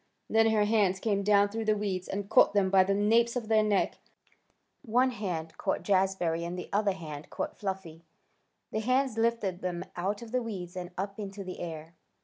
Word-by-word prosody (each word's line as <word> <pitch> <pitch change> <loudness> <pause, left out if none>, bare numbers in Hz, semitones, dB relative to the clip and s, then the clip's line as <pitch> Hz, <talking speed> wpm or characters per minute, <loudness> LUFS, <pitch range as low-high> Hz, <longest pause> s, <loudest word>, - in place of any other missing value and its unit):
Then 225 0 +4
her 215 -1 +3
hands 205 -3 +2
came 200 -1 0
down 200 0 +4
through 225 +2 -4
the 215 -1 +2
weeds, 190 -3 -2
and 200 0 -4
caught 200 - +5
them 190 -2 +3
by 190 -1 +6
the 195 +1 +1
napes 230 +4 +3
of 235 -3 -3
their 220 -1 +5
necks. 210 -2 +1 0.8
One 255 +1 +2
hand 175 -8 -4
caught - - -1
Jazbury 185 -4 +1
and 175 +1 -4
the 180 - -6
other 205 -1 +2
hand 155 -5 -8
caught - - -5
Fluffy. 190 -5 -5 0.7
The 220 - -1
hands 255 +2 +1
lifted 225 -6 0
them 175 -1 -3
out 200 +5 -2
of 225 - -10
the 255 0 +1
weeds 190 -6 -6
and 180 -1 -5
up 200 +2 -4
into 200 -1 -6
the 185 -1 -7
air. 160 -1 -6
200 Hz, 195 wpm, -29 LUFS, 185-220 Hz, 0.8 s, by